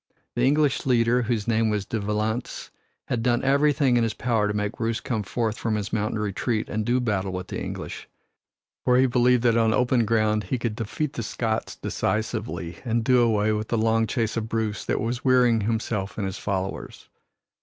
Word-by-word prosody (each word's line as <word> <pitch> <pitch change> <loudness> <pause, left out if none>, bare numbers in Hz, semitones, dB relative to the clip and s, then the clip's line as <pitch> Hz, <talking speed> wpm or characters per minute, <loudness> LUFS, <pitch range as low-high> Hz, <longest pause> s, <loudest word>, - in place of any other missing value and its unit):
The 120 - 0
English 145 -1 +2
leader, 120 0 +3
whose 115 -3 -1
name 115 -1 +2
was 105 -2 -1
De 110 +2 -3
Valence, 105 +3 -3 0.3
had 120 - -2
done 120 +1 +1
everything 140 -1 +3
in 120 - +3
his 115 -1 -1
power 115 -3 +1
to 105 - -1
make 105 0 -1
Bruce 115 0 -1
come 115 -5 -2
forth 110 +2 -2
from 110 -1 -1
his 105 -1 -4
mountain 110 0 0
retreat 105 +2 -2
and 110 +1 -1
do 120 +4 +1
battle 100 -6 -1
with 90 0 -5
the - - -4
English, - - -6 0.7
for 125 0 +4
he 130 - +5
believed 125 -1 +3
that 115 -1 +4
on 115 -1 +3
open 125 -1 +2
ground 110 -1 +1
he 125 - -1
could 115 -2 -2
defeat 120 +7 -3
the - - -4
Scots 110 0 -2
decisively 110 -6 -3
and 115 -1 0
do 125 +1 +4
away 110 -2 +2
with 110 0 -2
the 115 - 0
long 115 0 +2
chase 110 +1 -1
of 110 -1 -3
Bruce 110 -2 -2
that - - 0
was 120 +2 -2
wearying 125 -3 +4
himself 105 -2 -2
and 105 - -1
his 95 -1 -4
followers. 95 -1 -4
115 Hz, 195 wpm, -25 LUFS, 105-120 Hz, 0.7 s, he